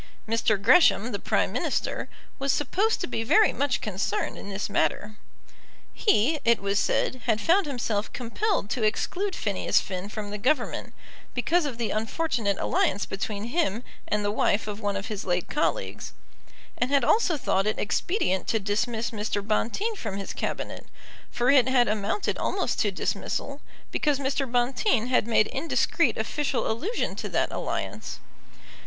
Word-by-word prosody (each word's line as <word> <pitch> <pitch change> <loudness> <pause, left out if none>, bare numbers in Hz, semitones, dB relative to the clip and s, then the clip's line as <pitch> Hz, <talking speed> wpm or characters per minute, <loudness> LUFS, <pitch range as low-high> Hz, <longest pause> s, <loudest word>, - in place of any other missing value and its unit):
Mr. 220 -2 +2
Gresham, 240 - +5
the 200 - -3
Prime - - +1
Minister, - - -2 0.3
was 275 0 +1
supposed 390 - +1
to - - 0
be 225 - -2
very 425 - +4
much 280 -1 0
concerned 195 -2 -2
in 200 - -8
this 195 +1 -3
matter. 210 +1 -1 0.8
He, 305 - +2
it 235 0 +4
was 200 0 0
said, 255 +4 0
had 225 -3 +2
found 345 - +3
himself 230 -6 -2
compelled 250 - -1
to 250 - -1
exclude 365 - 0
Phineas 205 -3 +1
Finn 185 +1 -5
from 210 -1 -5
the 210 - -4
Government, 255 +2 0 0.4
because 325 +7 +2
of 255 -5 -5
the 235 -2 -1
unfortunate 220 -2 -1
alliance 200 - +1
between 200 +1 -4
him 240 - 0 0.2
and 210 0 0
the 205 - +1
wife 210 0 +1
of 210 0 -4
one 205 -2 -1
of 195 0 -3
his 210 -2 -4
late 180 -1 -1
colleagues, 295 - -2 0.7
and 245 - +1
had 280 -2 +3
also 355 - +3
thought 195 -6 +1
it 215 - 0
expedient 205 - 0
to 225 - +1
dismiss 220 +3 -1
Mr. 210 -2 -2
Bonteen 390 - 0
from 215 - -5
his 195 - -5
Cabinet, - - -4 0.4
for 245 +2 +2
it 265 -3 +5
had 250 -2 +4
amounted 215 - -1
almost - - -1
to - - +2
dismissal, - - -3 0.3
because 295 -2 +1
Mr. 270 -1 -1
Bonteen 245 - +1
had 250 -3 +2
made 220 -2 +4
indiscreet 280 +9 +1
official 295 -4 -1
allusion 355 - -2
to - - -5
that - - 0
alliance. - - -4
230 Hz, 160 wpm, -26 LUFS, 205-280 Hz, 0.8 s, Gresham